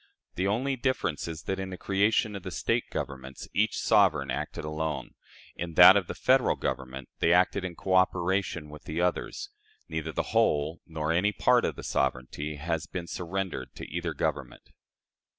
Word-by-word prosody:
The 95 +2 -1
only 130 +7 0
difference 120 - -1
is 80 -2 -6
that, 95 0 -2
in 95 0 -4
the 90 - -6
creation 100 +3 +1
of 100 - -5
the 95 - -6
State 115 +6 0
governments, 65 -1 -6
each 110 +2 +1
sovereign 85 - +3
acted 65 - -4
alone; 75 0 -3 0.4
in 85 -1 -5
that - - +10
of - - +1
the - - -5
Federal - - +3
Government, 65 0 -4
they 85 - +3
acted 90 +2 +3
in 90 -2 -4
coöperation 95 -3 +1
with 75 - -12
the 80 -1 -3
others. 90 - -1 0.4
Neither - - -3
the - - -1
whole 80 -8 +2
nor 80 -1 -2
any 90 +5 +2
part 100 - +3
of - - -2
their - - -9
sovereignty 70 +3 -2
has 80 +2 -3
been 90 -2 -5
surrendered 90 +2 -4
to - - -8
either 85 -1 -3
Government. - - -3
85 Hz, 170 wpm, -28 LUFS, 75-95 Hz, 0.4 s, that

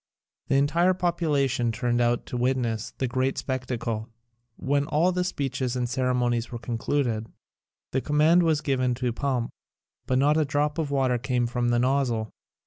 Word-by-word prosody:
The - - +1
entire 165 +7 +3
population 150 -9 +1
turned 120 +1 0
out 120 0 +1
to - - -6
witness 120 -3 0
the 130 - -1
great 130 +2 -1
spectacle. 125 -4 -3 0.5
When 140 +1 0
all 165 +4 +2
the 180 0 0
speeches 135 -7 -2
and 125 -1 -1
ceremonies 125 -2 0
were 120 - -4
concluded, 115 -1 -1 0.6
the 135 - 0
command 155 +5 +4
was 160 -3 +2
given 130 -4 0
to 125 -1 -2
pump, 125 -2 -1 0.6
but 130 - +2
not 145 +3 +3
a 155 - +3
drop 145 +2 0
of 155 -3 -1
water 130 -3 +1
came 125 0 0
from 120 0 -1
the 120 - +2
nozzle. 125 -3 +1
130 Hz, 160 wpm, -26 LUFS, 120-145 Hz, 0.6 s, command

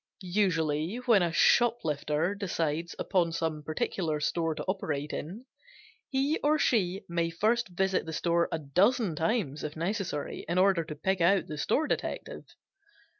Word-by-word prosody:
Usually 170 -3 0
when 240 -5 +3
a 170 -1 +1
shoplifter 165 -6 +2
decides 170 -5 -2
upon 175 -4 +1
some 160 -2 -2
particular 155 +1 -2
store 165 +1 0
to 150 - -4
operate 150 -6 -3
in, 195 - -6 0.6
he 275 +3 +1
or 300 +1 +2
she 195 -8 +1
may 170 -1 0
first 220 +8 +1
visit 190 0 0
the - - -4
store 170 +1 +1
a - - 0
dozen 180 - +2
times 165 - -1
if 150 0 -5
necessary 175 -3 -3
in 175 - 0
order 185 -2 +4
to 155 -1 -7
pick 190 +5 -1
out 190 +3 +4
the 155 - -7
store 275 - +1
detective. - - -4
175 Hz, 150 wpm, -29 LUFS, 155-200 Hz, 0.6 s, order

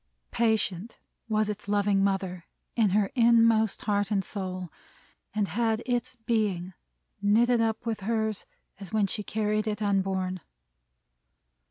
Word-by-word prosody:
Patient! 220 -3 0 0.3
Was 215 -1 +2
its 210 -1 -5
loving 205 -1 +2
mother 190 -3 -1 0.3
in 225 -4 +3
her 200 +1 +1
inmost 230 -3 +4
heart 205 -1 0
and 200 -3 0
soul, 185 -3 -5 0.6
and 210 -2 +1
had 225 +3 0
its 250 +1 -1
Being 210 -6 -1 0.5
knitted 230 +4 +4
up 225 +1 -1
with 225 -2 -2
hers 220 0 -2 0.3
as 195 -2 -9
when 215 -2 +2
she 195 - -2
carried 215 +1 -1
it 210 -1 -2
unborn. 190 -2 0
210 Hz, 130 wpm, -28 LUFS, 195-225 Hz, 0.6 s, inmost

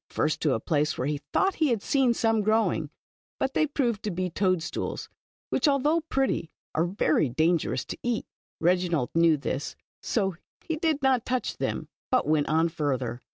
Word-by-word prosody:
First 155 - 0
to 150 -4 +2
a - - -1
place 150 +4 0
where 125 - -1
he 145 0 -1
thought 385 0 +2
he 310 - +5
had 230 -6 0
seen 260 -4 +2
some 225 -1 +2
growing, 220 +2 +1 0.5
but 265 - -1
they 310 - +2
proved 240 -7 0
to 210 - -2
be 185 -1 -2
toad 185 -2 +1
stools, - - -4 0.4
which, - - +2
although 295 +4 +3
pretty, 270 - -1 0.2
are 160 - +2
very 155 -6 +2
dan 160 +7 +3
gerous - - -3
to - - -7
eat. 240 -2 -1 0.3
Reginald 175 -5 +1
knew 165 -1 +4
this, 140 0 -3 0.3
so 195 -6 -1 0.3
he 320 - -1
did 310 -3 0
not 260 -3 +3
touch 255 0 -2
them, - - -2 0.2
but 255 - +2
went 150 -1 +2
on 160 +2 +3
farther. 130 -7 -2
185 Hz, 185 wpm, -27 LUFS, 155-255 Hz, 0.5 s, he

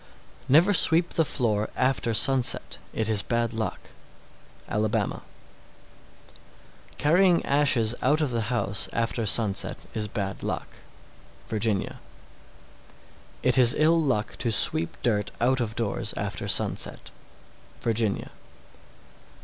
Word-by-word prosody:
651. - - -1
Never 205 +3 0
sweep 170 -1 +5
the 165 - +1
floor 110 -8 -2
after 130 -2 0
sunset; 130 +3 +3
it 110 - -2
is 110 -2 +1
bad 115 +1 -2
luck. 110 -1 -6 0.8
Alabama. 105 0 -2 1.7
652. - - -23
Carrying 175 +3 +2
ashes 135 -6 +2
out 145 +4 +1
of 150 -5 -1
the 115 -2 -3
house 105 -4 -1
after 115 -1 -2
sunset 100 -2 +2 0.2
is 105 -1 -2
bad 100 -2 -5
luck. - - -4 0.8
Virginia. 110 -3 -2 1.4
653. - - +2
It - - +3
is 120 -1 +6
ill 165 +2 +3
luck 125 -8 -2
to 120 - -1
sweep 85 -6 +3
dirt 105 -4 0
out 130 +2 +1
of 110 -2 -4
doors 115 -5 -3
after - - -4
sunset. - - 0 0.7
_Virginia. 110 -3 -2
115 Hz, 120 wpm, -25 LUFS, 110-135 Hz, 1.7 s, is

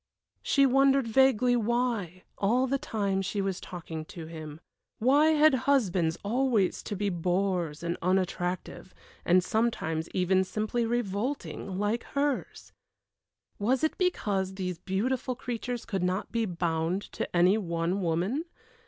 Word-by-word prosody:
She 275 -1 +3
wondered 270 -1 +4
vaguely 250 0 +4
why, 230 -6 -1
all 240 +6 +2
the 275 +1 0
time 200 -5 -1
she 195 +2 -3
was 195 -2 -2
talking 165 -3 -7
to 165 0 -9
him. 155 -2 -8 0.4
Why 280 +6 +4
had 305 -1 +5 0.2
husbands 180 -11 +2
always 230 -2 +1
to 205 - -5
be 200 +1 -1
bores 175 -2 -1
and 170 0 -1
unattractive, 185 0 -2 0.3
and 180 +1 +4
sometimes 170 -8 -1
even 185 +1 +2
simply 215 +4 -1
revolting, 225 -3 -3
like 210 +4 0
hers? 280 -1 -2 0.9
Was 245 +7 +1
it 315 - +1
because 200 - 0
these 180 -3 -4
beautiful 245 +8 -1
creatures 245 0 -4
could 195 -5 -2
not 180 +2 -1
be 230 -1 0
bound 170 +1 -1
to - - -4
any 185 +5 +5
one 170 0 -1
woman? 185 - 0
200 Hz, 135 wpm, -28 LUFS, 180-245 Hz, 0.9 s, had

